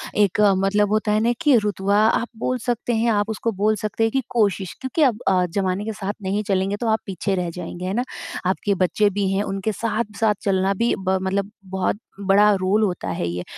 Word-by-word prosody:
एक 205 0 +2 0.2
मतलब 200 +2 +2
होता 215 0 +1
है 215 - +3
ना 235 +2 +2
कि 295 -5 +5
रुतबा 200 -1 0
आप 230 +1 +1
बोल 255 +2 -1
सकते 240 0 -1
हैं। 230 +1 +2
आप 205 0 +1
उसको 220 +1 -2
बोल 215 +1 +3
सकते 215 +2 -2
हैं 225 - +2
कि 270 - +1
कोशिश, 200 -5 0
क्योंकि 260 +5 -2
अब 240 -6 +2 0.4
ज़माने 195 +1 0
के 220 - -3
साथ 205 -1 -4
नहीं 200 +2 -1
चलेंगे 195 0 +1
तो 235 +1 -3
आप 220 0 +2
पीछे 195 +1 -2
रह 180 -2 -2
जाएँगे, 175 +1 -7
है 190 - -2
ना? 245 - 0 0.4
आपके 195 +2 0
बच्चे 190 +3 +2
भी 200 0 -1
हैं, 195 +1 +1
उनके 195 +2 -2
साथ-साथ 215 0 -1
चलना 195 0 +1
भी 235 +4 +1
ब 190 0 0
मतलब 195 +2 -1
बहुत 190 +1 -1 0.3
बड़ा 205 +2 +6
रोल 200 +4 +2
होता 180 - -2
है 85 -1 -2
ये। 90 +1 -3
205 Hz, 210 wpm, -22 LUFS, 190-220 Hz, 0.4 s, बड़ा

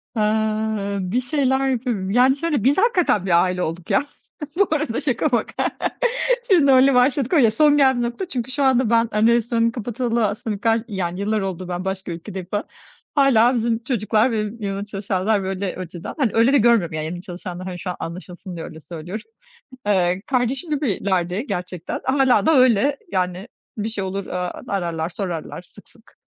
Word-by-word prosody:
Aaa, 215 -1 0
bir 190 +7 -1
şeyler 265 0 +1
yapıyorum. 235 -7 -1
Yani, 255 +4 +4
şöyle, 295 -6 -1
biz 270 +4 +3
hakikaten 365 - +2
bir 175 -2 +4
aile 180 -1 -1
olduk, 165 +2 -5
ya. 290 - +3 0.5
Bu 400 +2 +3
arada 305 -7 0
şaka 260 0 0
maka. 235 -3 0 0.8
Şimdi 315 -8 +5
öyle 265 +1 +6
başladık, 255 +2 +2
o 330 - +5
ya 230 -5 +5
son 295 +6 +4
geldiği 265 -3 +4
nokta. 240 +10 -3
Çünkü 255 -4 -4
şu 280 +2 -1
anda 260 -3 +3
ben, 230 0 +3
hani, 215 +2 +3
restoranı 235 0 +2
kapatalı 235 -1 -1
aslında 205 0 -4
ka 225 0 +3
yani, 185 -4 -3
yıllar 210 +1 0
oldu, 185 -2 -4
ben 180 +1 -4
başka 190 -1 -3
ülkedeyim 175 +2 -7
falan, 205 0 -1 0.5
hâlâ 255 -4 +5
bizim 230 -1 0
çocuklar 225 -1 +1
ve 225 - -1
benim 215 +2 -7
yanımda 200 0 -3
çalışanlar, 200 0 -1
böyle, 190 0 -3
önceden. 175 -2 -7
Hani, 260 -8 +1
öyle 230 +4 +4
de - - +6
görmüyorum, 230 - +3
yani. 155 0 -3
Yani, 175 +2 -5
çalışanları, 180 0 -7
hani, 180 -1 -6
şu 185 - -5
an 180 - -3
anlaşılsın 180 +2 -7
diye 165 - -6
öyle 160 - -10
söylüyorum. 175 - -8 0.6
Eee, 185 -1 +2
kardeşim 260 +4 -1
gibilerdi 200 - -1
gerçekten, 180 -3 -4
hâlâ 265 0 +3
da 320 - +5
öyle. 255 +2 +4 0.2
Yani, 185 +2 -2 0.3
bir 210 +1 -1
şey 210 -3 -3
olur, 190 +1 -4
aaa, 180 -1 -4
ararlar, 170 -4 -2
sorarlar 175 -3 -5
sık - - -17
sık. - - -22
215 Hz, 180 wpm, -21 LUFS, 185-255 Hz, 0.8 s, öyle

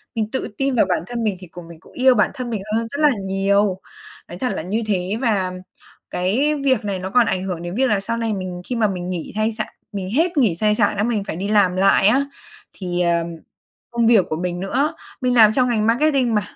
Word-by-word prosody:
mình 220 -1 -2
tự 265 - -2
tin 270 0 0
vào 225 - +4
bản 180 - 0
thân 240 -1 -3
mình 210 -3 0
thì 185 - -11
cùng 170 0 -11
mình 165 -1 -12
cũng - - -20
yêu 260 0 +4
bản 210 - +2
thân 250 -2 -5
mình 220 -4 -3
hơn 230 0 -1
rất 285 - -6
là 300 - +6 0.2
nhiều, 195 0 +1 0.5
nói - - -9
thật 255 - -1
là - - -3
như 205 +7 -2
thế. 190 -1 -1
Và 200 -7 +1 0.6
cái 240 +12 +1
việc 260 -5 +2
này 195 -2 -2
nó 185 +1 -4
còn 240 +4 +4
ảnh 185 -3 -1
hưởng 180 -3 -4
đến 175 +1 -5
việc 260 +2 +2
là 210 - +2
sau 230 +4 -3
này 230 -1 -1
mình 185 -2 -5
khi 250 - -2
mà 225 -2 +2
mình 180 -2 -4
nghỉ 175 -3 -4
thai 215 +1 +1
sả 215 0 -3 0.3
mình 195 -2 -4
hết 330 +7 +1
nghỉ 225 -11 +3
sai 210 +4 +1
sản 210 -1 +1
á, 205 - +1
mình 220 -3 0
phải 195 - -5
đi 190 +4 -3
làm 200 -4 +3
lại 195 +1 +4
á, 265 +6 +3 0.5
thì, 180 -2 -3
ờm, 170 -1 +1 0.6
công 235 -1 +1
việc 225 -5 +5
của 155 - -2
mình 175 +1 -3
nữa. 275 - 0 0.3
Mình 250 -1 +1
làm 220 -3 +7
trong 250 +1 +2
ngành 220 -3 +1
marketing 255 0 +2
mà, 210 - +2
210 Hz, 250 wpm, -21 LUFS, 185-240 Hz, 0.6 s, làm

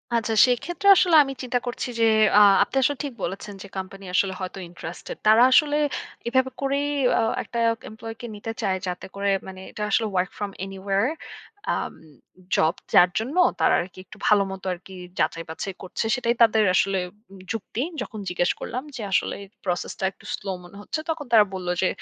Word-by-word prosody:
আচ্ছা 225 -1 0
সেক্ষেত্রে 310 +10 -1
আসলে 355 -3 +4
আমি 270 -1 -5
চিন্তা 250 0 0
করছি 245 +1 -3
যে 230 - +5 0.3
আ - - +9 0.2
আপনি - - -9
আসলে 285 +2 +2
ঠিক 280 -3 -4
বলেছেন 195 +3 -4
যে - - -9
কোম্পানি 195 +1 -7
আসলে 190 +1 +2
হয়তো 185 +1 -5
ইন্টারেস্টেড 170 0 -8
তারা 220 +2 +7
আসলে 295 +1 +5 0.5
এভাবে 260 +2 +2
করেই 280 +1 0 0.3
আ - - +2 0.2
একটা 235 - -7 0.3
এমপ্লই 225 +1 -8
কে - - -6
নিতে 210 +2 -5
চায় 195 -3 0
যাতে 180 +1 -4
করে 200 0 0 0.2
মানে 190 0 -9
এটা - - -8
আসলে 225 +2 +2
work 180 +1 +1
from 205 -1 -2 0.2
anywhere 195 +3 -1 0.7
um - - -3 0.6
job 160 +1 +3 0.2
যার 180 - +7
জন্য 250 +8 -4 0.2
তারা - - +4
আরকি 180 +1 -9
একটু 210 +3 -14
ভাল 210 - +5
মত 190 -1 -8
আরকি 185 +2 -11 0.3
যাচাই 165 - 0
বাছাই 190 +4 -5
করছে 185 +4 -3
সেটাই 235 -2 +1
তাদের 220 -1 +6
আসলে 195 0 +2 0.5
যুক্তি 225 +1 -4 0.2
যখন 215 - -6
জিজ্ঞেস 175 0 +1
করলাম 255 +2 -4
যে 240 - -5
আসলে - - +1 0.3
প্রসেস 180 -2 -2
টা - - -5
একটু - - -21
স্লো 200 - -8
মনে 175 +3 -13
হচ্ছে, 260 - -4
তখন 315 -2 -2
তারা 220 -3 +7
বলল 185 -1 -5
যে 190 - +3
210 Hz, 185 wpm, -24 LUFS, 190-245 Hz, 0.7 s, আ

